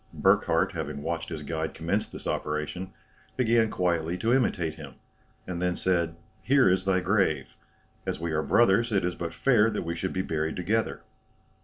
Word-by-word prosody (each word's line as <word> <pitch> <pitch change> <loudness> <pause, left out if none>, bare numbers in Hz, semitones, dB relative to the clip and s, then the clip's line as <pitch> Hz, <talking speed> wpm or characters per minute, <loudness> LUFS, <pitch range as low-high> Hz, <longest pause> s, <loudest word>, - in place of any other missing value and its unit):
Burckhardt - - +3
having 70 0 -5
watched 85 +1 -3
his 80 -2 -5
guide 80 +1 -3
commence 95 +6 -1
this - - -10
operation, 75 +5 -3 0.5
began 115 -3 +3
quietly 85 -2 0
to 115 +5 +1
imitate 90 -11 +1
him, 75 -4 -10 0.5
and 90 -1 -4
then 90 0 +1
said, 85 -3 0 0.3
"Here 135 -2 +4
is 95 +1 +2
thy 95 -1 +2
grave; 95 -4 +1 0.5
as - - -3
we 85 0 -3
are 80 0 +1
brothers, 115 +5 +3
it 100 -4 +2
is 90 - -1
but 85 -1 -5
fair 115 -5 +3
that 105 - -3
we 85 - -2
should 95 +3 -3
be 95 - -1
buried 80 -2 -2
together." 105 +5 -1
90 Hz, 175 wpm, -27 LUFS, 80-105 Hz, 0.5 s, Here